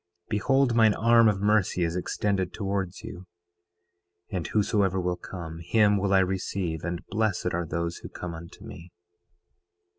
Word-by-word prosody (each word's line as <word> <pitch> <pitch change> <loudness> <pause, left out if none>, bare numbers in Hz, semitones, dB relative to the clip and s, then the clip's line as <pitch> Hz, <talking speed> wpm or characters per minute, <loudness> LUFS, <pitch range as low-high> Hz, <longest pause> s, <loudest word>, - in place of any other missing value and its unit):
Behold, 130 +4 +2
mine 110 -2 +5
arm 115 0 +5
of 100 -2 +1
mercy 105 -4 +2
is 85 0 -1
extended 95 0 -1
towards 95 -3 -3
you, 90 +1 -9 1.0
and 90 -5 -2
whosoever 100 -3 +1
will 90 0 -1
come, 85 -3 -8
him 105 +4 +3
will 100 0 0
I 95 -1 +5
receive; 95 -3 -2
and 85 0 -4
blessed 105 -4 0
are 85 -1 -2
those 85 +2 -3
who - - -9
come 90 -1 -6
unto 85 +1 -11
me. 85 +2 -11
95 Hz, 150 wpm, -27 LUFS, 85-105 Hz, 1.0 s, mine